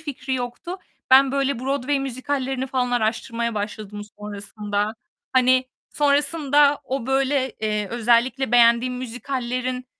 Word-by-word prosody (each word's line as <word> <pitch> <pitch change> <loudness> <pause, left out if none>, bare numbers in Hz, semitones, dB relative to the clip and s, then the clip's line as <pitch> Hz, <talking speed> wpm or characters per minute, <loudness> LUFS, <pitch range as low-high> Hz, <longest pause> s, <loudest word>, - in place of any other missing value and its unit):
fikri 275 -3 -4
yoktu. 250 +9 -5 0.3
Ben 265 0 +7
böyle 275 -2 0
Broadway 275 +2 -1
müzikallerini 265 0 -2
falan 255 -1 -1
araştırmaya 235 0 -1
başladım 205 0 -5 0.2
sonrasında. 210 0 -3 0.4
Hani, 255 0 +4 0.3
sonrasında 290 0 +3
o, 260 -2 -3
böyle, 265 0 +1
eee, 210 -2 -1
özellikle 240 +2 +1
beğendiğim 240 +1 +5
müzikallerin, 250 0 -4
255 Hz, 110 wpm, -23 LUFS, 235-270 Hz, 0.4 s, Ben